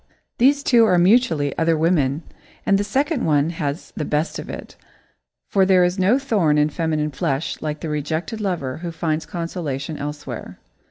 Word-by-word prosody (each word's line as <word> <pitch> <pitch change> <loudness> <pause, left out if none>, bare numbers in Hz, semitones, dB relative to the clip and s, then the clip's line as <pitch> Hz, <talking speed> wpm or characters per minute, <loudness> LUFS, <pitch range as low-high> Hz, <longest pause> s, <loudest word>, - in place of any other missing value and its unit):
These 280 +3 +4
two 235 -3 +5
are 185 -4 +3
mutually 175 - +3
"other 165 0 +2
women," 155 -2 +1 0.4
and 195 0 +3
the - - +1
second 275 +7 0
one 150 +1 +2
has 150 -2 -4
the 155 - -2
best 150 +2 -1
of - - -8
it, - - -8 0.7
for 195 - +3
there 185 -1 +5
is 180 +2 0
no 195 +7 +4
thorn 205 - +1
in 150 +1 +3
feminine 155 -2 -1
flesh 135 +2 -2
like 150 -1 -4
the 160 - -4
rejected 155 +9 -3
lover 170 -10 -2
who 170 0 -5
finds 160 -1 -2
consolation 165 -4 -4
elsewhere. 145 +1 -6
165 Hz, 170 wpm, -21 LUFS, 150-195 Hz, 0.7 s, two